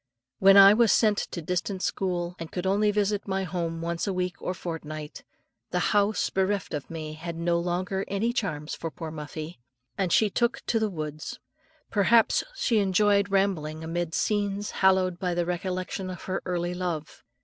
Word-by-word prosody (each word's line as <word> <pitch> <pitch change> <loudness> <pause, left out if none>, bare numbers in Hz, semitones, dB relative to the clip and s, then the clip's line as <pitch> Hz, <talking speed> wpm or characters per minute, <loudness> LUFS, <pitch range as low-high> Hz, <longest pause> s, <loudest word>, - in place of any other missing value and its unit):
When 195 +1 +7
I 195 0 +10
was 230 0 +4
sent 215 -2 +3
to 170 - -5
a - - -12
distant 180 +3 -2
school, 175 -2 -1
and 165 -1 -7
could 180 0 -4
only 205 +2 +3
visit 205 0 0
my 190 0 -1
home 170 -3 -3
once 170 +3 -2
a 195 - 0
week 180 0 -3
or 185 - -3
fortnight, 155 -3 -6 0.5
the - - -1 0.2
house 205 +1 +2
bereft 195 -1 0
of 145 -2 -4
me 155 -2 -6
had 165 +2 -6
no 170 +1 +1
longer 180 +2 -1
any 220 +4 0
charms 160 -10 -3
for 165 - -4
poor 160 0 -7
Muffie, 155 0 -7 0.4
and 185 -3 +1
she 220 - +5
took 235 +4 0
to 225 - +1
the 220 -1 0
woods. 155 -3 -5 0.5
Perhaps 225 +2 +4
she 230 - +2
enjoyed 200 +1 +3
rambling 170 -6 0
amid 165 0 -2
scenes 205 -1 0
hallowed 185 -2 +2
by 180 -2 -1
the 175 0 0
recollection 185 +1 -3
of 180 -2 -7
her 190 0 -2
early 175 -1 -1
love. 175 -4 -4
185 Hz, 180 wpm, -27 LUFS, 165-200 Hz, 0.5 s, I